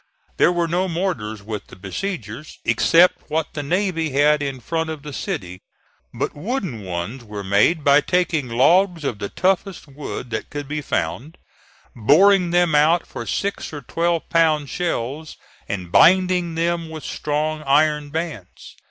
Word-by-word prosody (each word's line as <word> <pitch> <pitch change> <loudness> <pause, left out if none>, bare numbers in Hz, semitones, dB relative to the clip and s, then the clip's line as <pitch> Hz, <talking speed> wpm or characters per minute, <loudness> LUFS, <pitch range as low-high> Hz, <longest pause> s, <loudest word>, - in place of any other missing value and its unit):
There - - +5
were 175 -1 0
no 180 +3 0
mortars 160 - -3
with 105 -1 -6
the - - -13
besiegers, 115 - -6
except 180 +1 +3
what 160 +1 -2
the 145 - -3
navy 170 +1 -1
had 145 +2 +3
in 135 -2 -3
front 160 +6 -2
of 155 -3 -6
the 150 -1 -8
city; 90 -6 -5 0.5
but - - -3
wooden 180 - -3
ones 95 +8 -5
were 105 -2 -7
made 100 - +2
by 140 +1 +5
taking 165 -7 0
logs 170 +8 +3
of 120 -7 -3
the 100 - -4
toughest 190 -2 -1
wood 135 -3 -7
that - - -4
could 145 -1 -6
be 150 +1 -3
found, 130 - -3 0.6
boring 180 - +5
them 175 -2 +2
out 155 +4 +4
for - - -8
six 200 0 -2
or 145 -2 -7
twelve 170 +5 -1
pound 155 -4 +2
shells 155 -2 -3 0.3
and 90 -4 -4
binding 180 - +4
them 170 0 -1
with 160 -1 -8
strong 155 +1 -2
iron 150 +1 +2
bands. 150 - -6
155 Hz, 155 wpm, -21 LUFS, 130-170 Hz, 0.6 s, There